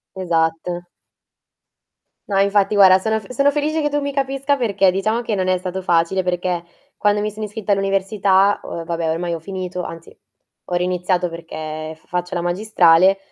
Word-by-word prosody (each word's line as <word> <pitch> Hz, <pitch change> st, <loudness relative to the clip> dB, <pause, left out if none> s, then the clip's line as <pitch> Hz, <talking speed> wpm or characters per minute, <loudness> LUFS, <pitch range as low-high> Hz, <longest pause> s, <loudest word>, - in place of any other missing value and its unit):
Esatto. 170 Hz, 0 st, -1 dB, 1.4 s
No, 195 Hz, -, +1 dB
infatti 200 Hz, +1 st, +2 dB
guarda, 190 Hz, -1 st, +7 dB
sono 220 Hz, +3 st, 0 dB
f 205 Hz, -, -12 dB
sono 275 Hz, +3 st, +3 dB
felice 300 Hz, +2 st, -1 dB
che 295 Hz, -, +1 dB
tu 290 Hz, 0 st, -1 dB
mi 280 Hz, 0 st, -3 dB
capisca 275 Hz, +1 st, 0 dB
perché, 200 Hz, -6 st, +2 dB
diciamo 215 Hz, +5 st, 0 dB
che 225 Hz, -2 st, -2 dB
non 185 Hz, -1 st, -1 dB
è 185 Hz, -, +2 dB
stato 185 Hz, +1 st, -5 dB
facile 175 Hz, +2 st, +1 dB
perché, 180 Hz, -1 st, -1 dB, 0.3 s
quando 205 Hz, 0 st, +2 dB
mi 210 Hz, -, -1 dB
sono 215 Hz, +1 st, -5 dB
iscritta 210 Hz, 0 st, -3 dB
all'università, 195 Hz, 0 st, +2 dB
ho 165 Hz, -, -6 dB
vabbè, 165 Hz, -1 st, -2 dB
ormai 170 Hz, +1 st, -2 dB
ho 165 Hz, -, -6 dB
finito, 180 Hz, 0 st, -5 dB
anzi 165 Hz, -1 st, -9 dB, 0.6 s
ho -, -, +1 dB
riiniziato 180 Hz, 0 st, 0 dB
perché 155 Hz, -1 st, -7 dB
f -, -, -29 dB
faccio 180 Hz, 0 st, -3 dB
la 170 Hz, -, -1 dB
magistrale 185 Hz, -1 st, +4 dB
190 Hz, 170 wpm, -20 LUFS, 175-210 Hz, 1.4 s, guarda